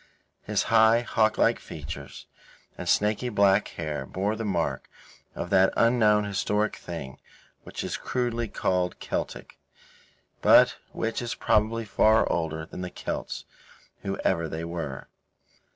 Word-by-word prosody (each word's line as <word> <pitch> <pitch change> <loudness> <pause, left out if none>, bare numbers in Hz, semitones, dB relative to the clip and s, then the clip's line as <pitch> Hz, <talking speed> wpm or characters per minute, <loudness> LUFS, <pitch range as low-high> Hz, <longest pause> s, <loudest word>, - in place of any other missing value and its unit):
His - - 0
high, 110 +1 +6
hawklike 110 -1 +2
features - - -8 0.5
and - - -5
snaky 105 +4 +2
black 100 -2 +3
hair 75 -5 -5
bore 100 +3 -1
the 115 - -4
mark 85 -10 -2 0.5
of 90 - -5
that 95 -1 +5
unknown 110 -3 +4
historic 105 +1 0
thing 75 -6 -7 0.5
which - - -6
is - - -3
crudely 120 -2 -2
called 90 -3 -1
Celtic, - - -5 0.8
but - - +6
which 115 +1 -2
is 120 -1 -3
probably 110 +2 +1
far 110 +1 +4
older 80 -1 -2
than 90 - -8
the 90 - -4
Celts, - - -5 0.6
whoever 95 -4 -1
they 80 +1 -4
were. 85 -6 -5
100 Hz, 125 wpm, -26 LUFS, 85-110 Hz, 0.8 s, high